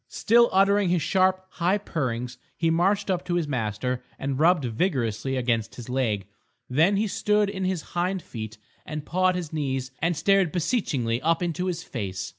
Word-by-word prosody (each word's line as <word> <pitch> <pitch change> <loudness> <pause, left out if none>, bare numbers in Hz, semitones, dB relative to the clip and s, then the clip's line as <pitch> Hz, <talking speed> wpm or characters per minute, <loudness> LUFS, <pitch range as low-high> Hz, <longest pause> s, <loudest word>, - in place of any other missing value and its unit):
Still 235 +2 +4
uttering 200 0 +4
his 175 -4 +1
sharp 185 +3 +2
high 180 +3 +1
purrings 125 - -3 0.2
he 165 -1 +2
marched 195 +4 +2
up 180 -1 -1
to 175 -1 -1
his 170 -3 0
master 125 -1 -2
and 135 0 -3
rubbed 165 -3 +4
vigorously 125 - -1
against 115 -4 -1
his 120 +2 -9
legs. 115 -7 0 0.4
Then 160 +10 +3
he 215 - +2
stood 210 0 +1
on 190 0 -2
his 185 -3 -1
hind 180 +1 -1
feet 110 -2 -7 0.3
and 150 -1 -6
pawed 185 +2 +2
his 170 -4 -4
knees 135 -4 -2
and 165 0 0
stared 195 -3 +3
beseechingly 140 - 0
up 165 +3 +1
into 175 +2 -2
his 175 -1 -3
face. 95 -6 -4
165 Hz, 175 wpm, -25 LUFS, 125-185 Hz, 0.4 s, Still